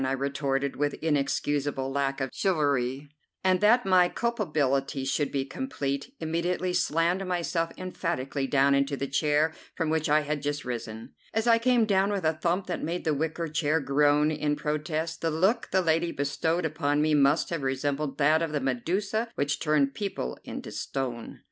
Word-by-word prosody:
I 130 0 0
retorted 140 0 -1
with 145 0 0
inexcusable 145 -2 -1
lack 135 0 -1
of 135 -1 -2
chivalry, 145 -6 0 0.4
and, 185 -1 +3
that 235 +4 +5
my 185 -2 +5
culpability 145 - -1
should 145 +2 0
be 135 -1 -1
complete, 140 - -4
immediately 175 +3 -1
slammed 170 +2 +1
myself 170 -2 -1
emphatically 150 -7 -3
down 140 0 +3
into 140 0 +1
the 135 - -2
chair 150 +3 +1 0.2
from 160 -2 -1
which 160 -1 0
I 150 +1 +4
had 150 0 -3
just 145 0 -3
risen. 115 -2 -6 0.2
As 220 +1 +1
I 230 -1 +5
came 240 -1 +3
down 195 -1 +2
with 200 -3 -2
a 160 - +3
thump 170 +4 -1
that - - -3
made 170 +3 -2
the 155 - +1
wicker 160 +3 -2
chair 150 +1 +1
groan 145 +2 +3
in 150 -1 0
protest, 155 +2 -3
the 165 - +1
look 190 +9 +1
the 190 - +2
lady 165 +1 +1
bestowed 160 +5 -1
upon 145 -2 0
me 155 +1 +2
must 145 +3 +3
have 165 -3 -2
resembled 135 +2 -2
that 155 +2 +4
of 165 -2 -2
the 150 - +1
Medusa 185 - -1
which 145 0 -1
turned 150 -3 +2
people 140 - -4
into - - -7
stone. 125 -4 -4
150 Hz, 175 wpm, -27 LUFS, 140-170 Hz, 0.4 s, that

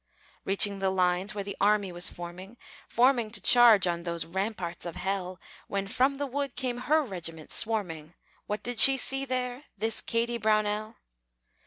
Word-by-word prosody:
Reaching 200 +1 +3
the 195 0 0
lines 185 +2 0
where 200 - -4
the 200 0 -7
army 205 -1 +2
was 175 0 0
forming, 180 +6 -10 0.3
Forming 245 -2 +2
to 215 -1 -2
charge 230 -2 +6
on 170 -1 -2
those 170 -1 -4
ramparts 190 -1 -4
of 170 -2 -6
hell, 185 -1 -4 0.3
When 195 0 -3
from 260 +6 +1
the 285 +1 -3
wood 280 0 -4
came 250 -3 -3
her 305 +5 +1
regiment 165 - -6
swarming, 175 -8 -2 0.3
What 210 0 -4
did 245 -1 -1
she 270 0 +9
see 270 +1 -1
there 255 +1 -4
this 220 +2 -2
Kady 235 +1 -2
Brownell? 215 0 0
210 Hz, 165 wpm, -27 LUFS, 185-240 Hz, 0.3 s, she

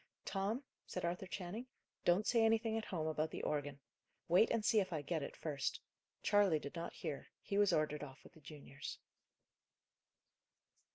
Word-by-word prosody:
"Tom," 205 +7 -1 0.2
said 180 - -3
Arthur 180 +2 -2
Channing, 195 +7 -5 0.4
"don't 180 +4 +4
say 235 -2 +4
anything 225 0 +3
at 225 - -1
home 165 -4 -2
about 155 0 0
the - - -5
organ. 145 -2 -1 0.5
Wait 180 +7 +6
and 230 -2 +1
see 220 - +5
if 190 -2 0
I 155 -3 -2
get 160 +2 -1
it, 140 - -5
first. 145 -4 -1 0.4
Charley 205 -5 +5
did 145 -1 -6
not 170 0 -4
hear; 140 -3 -4
he 200 - -1
was 205 -1 +5
ordered 150 -1 +1
off 135 -1 -8
with - - -15
the 160 - -17
juniors." 140 -1 -7
175 Hz, 170 wpm, -38 LUFS, 150-205 Hz, 0.5 s, Wait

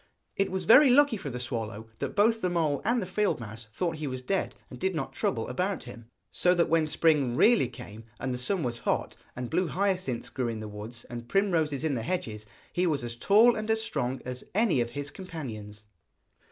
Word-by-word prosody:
It 195 - +1
was 190 0 -2
very 260 - +8
lucky 285 0 +5
for 195 -9 -5
the 125 -1 -5
swallow 110 -3 -4
that - - -3
both 225 +2 +3
the 180 - +1
mole 160 -5 0
and 235 0 +1
the - - -4
field 200 -1 0
mouse 110 0 -8
thought 165 +6 -2
he 155 -1 -4
was 130 -1 -5
dead, 195 +8 -1
and - - -11
did 190 -1 0
not 135 -4 -3
trouble 115 -4 -1
about 180 +9 -2
him, 120 -2 -11 0.2
so 180 0 +3
that 170 - +2
when 165 -1 +3
the - - -6
spring 150 -6 +2
really 225 - +5
came, 110 -2 -10
and 130 -1 -2
the 125 - -4
sun 175 +7 0
was 120 -2 -2
hot, - - -1 0.2
and 125 -1 -5
blue 180 +2 +1
hyacinths 185 -9 -1
grew 130 -3 -2
in 115 -2 -3
the 110 - -6
woods 105 +3 -8
and 120 0 -8
primroses 165 -8 +1
in 155 -3 +1
the 120 - -1
hedges, 110 -8 -3 0.3
he 180 +1 +1
was 145 -6 0
as 120 -1 -4
tall 215 - +5
and 215 0 -4
strong 130 - -2
as 125 0 -5
any 205 - +3
of 120 - -1
his 145 +4 -5
companions. 110 - -8
145 Hz, 220 wpm, -28 LUFS, 120-190 Hz, 0.3 s, very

